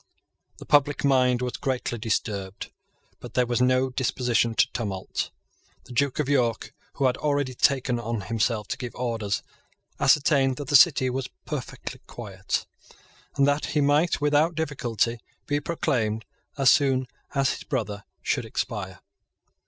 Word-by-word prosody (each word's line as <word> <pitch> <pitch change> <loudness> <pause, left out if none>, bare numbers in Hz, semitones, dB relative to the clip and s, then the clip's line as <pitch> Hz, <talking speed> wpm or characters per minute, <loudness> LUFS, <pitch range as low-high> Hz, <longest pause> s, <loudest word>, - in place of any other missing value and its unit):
The - - -11
public 145 0 +3
mind 125 -2 +3
was 125 - -3
greatly 125 -3 -2
disturbed; 100 -3 -3 0.5
but - - -10
there 125 - +3
was 120 +1 0
no 130 +1 +3
disposition 125 -2 +1
to - - +3
tumult. 100 -6 -3 0.5
The - - -15
Duke 140 +1 +1
of 150 - 0
York, 125 -5 +1 0.2
who 140 - 0
had 125 - +2
already 145 -3 0
taken 125 -2 +2
on 115 -2 -3
himself 110 0 -1
to 130 - -3
give 125 -2 -6
orders, 110 -6 -2 0.6
ascertained 140 -1 +4
that 145 -3 -6
the 145 - +3
City 130 -4 +6
was 130 0 -3 0.2
perfectly - - -6
quiet, - - -4 0.7
and 140 - +4
that 145 +1 +1
he - - +5
might 145 +4 +3
without 150 +3 +2
difficulty 120 -7 -1 0.3
be 145 0 0
proclaimed 125 - -1 0.3
as 135 -2 +6
soon 130 -2 +3 0.3
as 135 -1 +3
his - - -6
brother 105 -7 -3 0.2
should - - 0
expire. - - -4
130 Hz, 145 wpm, -26 LUFS, 115-140 Hz, 0.7 s, City